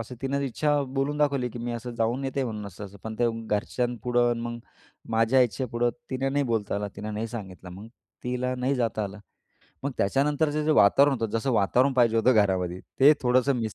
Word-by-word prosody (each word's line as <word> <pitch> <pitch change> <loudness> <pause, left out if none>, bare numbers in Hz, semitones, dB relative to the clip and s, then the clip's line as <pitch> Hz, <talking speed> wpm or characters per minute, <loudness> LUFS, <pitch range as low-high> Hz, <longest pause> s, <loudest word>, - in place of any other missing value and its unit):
असं 115 +3 -7
तिनं 140 +1 -1
इच्छा 145 +2 0
बोलून 140 +2 -1
दाखवली 140 -4 +1
की 120 - -8
मी 120 +1 -3
असं 120 +1 -5
जाऊन 115 +4 -1
येते 135 +1 -1
म्हणून 105 -4 -5
असं-असं, 100 +1 -10
पण 110 0 -5
ते 120 - +3 0.2
घरच्यांपुढं 120 +2 0
मग 120 0 -4 0.5
माझ्या 115 +3 +3
इच्छेपुढं 120 0 -1 0.2
तिनं 135 +1 -1
नाही 145 0 +1
बोलता 110 -5 -1
आलं 105 0 -3
तिनं 105 +1 -5
नाही 110 +2 -2
सांगितलं 95 -5 -8
मग, 95 +4 -10 0.4
तिला 125 +1 -1
नाही 130 +2 0
जाता 115 -3 -1
आलं. 100 +1 -7 0.7
मग 140 - -1
त्याच्यानंतरचं 145 +7 +1
जे 155 - +3
वातावरण 140 +3 +5
होतं 115 -3 -1
जसं 130 +4 -1
वातावरण 125 +6 +3
पाहिजे 120 -3 +3
होतं 125 +3 +4
घरामध्ये 95 -4 +1 0.2
ते 145 +3 +8
थोडंसं 130 +2 +2
मिस 115 -3 -3
120 Hz, 190 wpm, -26 LUFS, 110-135 Hz, 0.7 s, ते